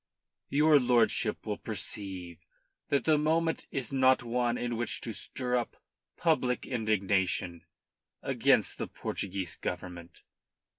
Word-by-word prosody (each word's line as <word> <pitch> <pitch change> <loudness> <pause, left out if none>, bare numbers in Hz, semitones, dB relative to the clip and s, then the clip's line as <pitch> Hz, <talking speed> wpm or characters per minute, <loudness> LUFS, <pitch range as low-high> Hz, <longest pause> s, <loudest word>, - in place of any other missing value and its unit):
Your 150 +1 +5
lordship 120 -3 +2
will - - -3
perceive 90 -4 -4 0.5
that 140 - +2
the 155 -2 +3
moment 160 +2 +1
is 135 -3 -3
not 130 -1 +4
one 120 0 0
in 120 -1 -2
which 120 +1 -1
to 115 - -4
stir 125 +3 -3
up 120 -2 -2 0.4
public 130 -7 +1
indignation 95 -6 0 0.6
against - - +2
the - - -2
Portuguese 95 -4 -4
Government. 90 -1 -6
120 Hz, 115 wpm, -30 LUFS, 95-130 Hz, 0.6 s, Your